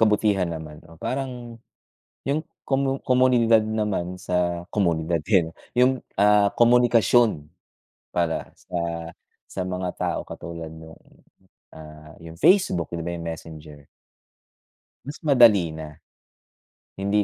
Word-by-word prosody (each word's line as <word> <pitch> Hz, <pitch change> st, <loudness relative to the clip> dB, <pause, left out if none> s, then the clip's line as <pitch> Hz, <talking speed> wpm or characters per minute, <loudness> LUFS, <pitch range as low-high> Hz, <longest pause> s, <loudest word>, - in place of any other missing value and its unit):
kabutihan 105 Hz, -4 st, +2 dB
naman. 80 Hz, -2 st, -8 dB
Oh, 80 Hz, 0 st, -16 dB
parang 125 Hz, -2 st, -5 dB, 0.7 s
yung 145 Hz, +3 st, 0 dB, 0.3 s
komo 135 Hz, 0 st, 0 dB
komunidad 125 Hz, -3 st, +4 dB
naman 105 Hz, -5 st, -2 dB
sa 85 Hz, -1 st, -1 dB
komunidad, 85 Hz, -4 st, 0 dB
tiyen, 90 Hz, -6 st, +3 dB, 0.2 s
yung, 125 Hz, +1 st, +2 dB, 0.2 s
ah, 105 Hz, 0 st, +5 dB
komunikasyon 120 Hz, -7 st, +3 dB, 0.6 s
para 85 Hz, -2 st, -2 dB
sa -, -, -10 dB, 0.7 s
sa 95 Hz, -, -5 dB
mga 90 Hz, 0 st, -3 dB
tao -, -, -1 dB
katulad 85 Hz, -1 st, -7 dB
nung, 80 Hz, 0 st, -12 dB, 0.7 s
ah, 75 Hz, 0 st, -12 dB
yung 80 Hz, -1 st, -11 dB
Facebook, 180 Hz, -, +3 dB
'di 85 Hz, -, -4 dB
ba, 85 Hz, -, -3 dB
yung 85 Hz, -, -7 dB
Messenger. 75 Hz, -3 st, -9 dB, 1.2 s
Mas 145 Hz, +3 st, -7 dB
madali 110 Hz, -, +5 dB
na. 75 Hz, -2 st, -9 dB, 1.0 s
Hindi 100 Hz, +1 st, +1 dB
95 Hz, 110 wpm, -24 LUFS, 80-120 Hz, 1.2 s, ah